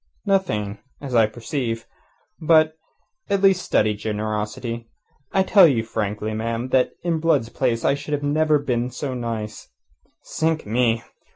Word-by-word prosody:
"Nothing 110 - 0 0.2
as 135 -3 -7
I 115 -2 +5
perceive. 115 0 -4 0.6
But, 155 0 +4 0.5
at 200 0 +1
least, 190 -2 +5
study 105 0 +2
generosity. 110 +2 -4 0.4
I 190 - +3
tell 190 -2 +7
you 120 -7 +1
frankly, 105 -1 -3
ma'am, 115 +3 -3
that 130 -1 +2
in 170 -2 0
Blood's 155 -8 +2
place 115 -2 -1
I - - +4
should 145 +1 -3
never 155 +1 +3
have 145 - -8
been 125 -1 0
so 130 +2 -4
nice. 115 -3 -5 0.6
Sink 160 0 -1
me! 115 +1 +1
125 Hz, 145 wpm, -22 LUFS, 110-155 Hz, 0.6 s, tell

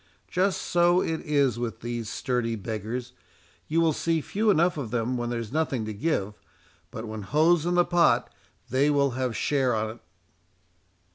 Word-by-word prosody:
—Just 190 +1 +1
so 175 +1 +3
it 160 -3 -1
is 140 -6 +1
with 120 -2 -4
these 120 -2 -4
sturdy 120 -3 -1
beggars. 115 +4 -5 0.5
You 160 +2 +1
will 165 -2 +3
see 165 +2 0
few 210 +8 -1
enough 175 -2 +3
of 140 -7 -4
them 120 +2 -1
when 120 -1 -2
there's 115 -3 -4
nothing 140 -6 -1
to 110 - -4
give, 105 -4 -1 0.6
but 115 - -7
when 110 0 -6
hough's 155 - +3
in 175 - +1
the 175 0 +4
pot, 175 -1 +2 0.4
they 135 +3 +3
will 140 -2 +2
have 125 -2 -2
share 135 -4 +1
on't." 110 +1 -3
130 Hz, 165 wpm, -26 LUFS, 115-160 Hz, 0.6 s, the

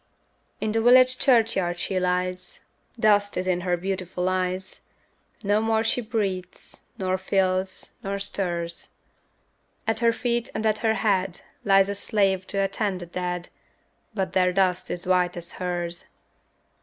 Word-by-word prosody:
In 215 - -1
the 225 +1 +1
village 255 +2 +6
churchyard 220 -9 +3
she 185 +1 -1
lies, 180 0 -1 0.3
Dust 205 -2 +3
is 185 - -1
in 180 -1 +1
her 180 -1 0
beautiful 185 -1 -3
eyes, 185 0 -2 0.6
No 205 +1 +2
more 220 0 +2
she 230 +2 +1
breathes, 200 -5 -4 0.2
nor 185 -1 -1
feels, 190 0 0
nor 195 0 -2
stirs; 175 -4 -3 1.0
At 225 -1 0
her 230 0 +4
feet 235 0 -1
and 220 - -2
at 215 -1 +2
her 220 -1 +2
head 190 -4 0 0.2
Lies 195 -1 +5
a 200 - -1
slave 195 -2 0
to 200 - -4
attend 195 -1 0
the - - -5
dead, 180 0 -4 0.7
But 190 -3 -2
their 180 -1 +3
dust 185 -1 +1
is 175 - -3
white 180 -1 +2
as 175 0 -6
hers. 175 -1 -3
190 Hz, 145 wpm, -25 LUFS, 180-215 Hz, 1.0 s, village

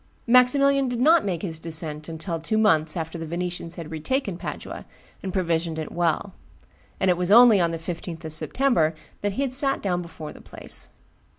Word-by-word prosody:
Maximilian 270 +3 +5
did 245 -1 -2
not 320 +6 +5
make 180 -5 -3
his 165 -4 -4
descent 155 -1 -2
until 165 +1 -4
two 165 +7 -1
months 160 -7 +3
after 165 +1 -4
that 165 - -4
the - - -9
Venetians 175 0 -4
had 165 -2 -8
retaken 195 - -2
Padua - - -7 0.3
and 190 - -4
provisioned 170 -3 -1
it 155 -1 -5
well; 175 +3 0 0.7
and 190 - +3
it 175 - +1
was 180 0 0
only 230 -1 +8
on 170 -1 +2
the 165 - -3
15th 165 0 -6
of 155 - -6
September 170 - +1 0.3
that 205 -1 -1
he 275 +6 0
sat 275 +1 +1
down 180 -3 -1
before 165 -3 -8
the - - -14
place. - - -7
175 Hz, 190 wpm, -24 LUFS, 160-220 Hz, 0.7 s, only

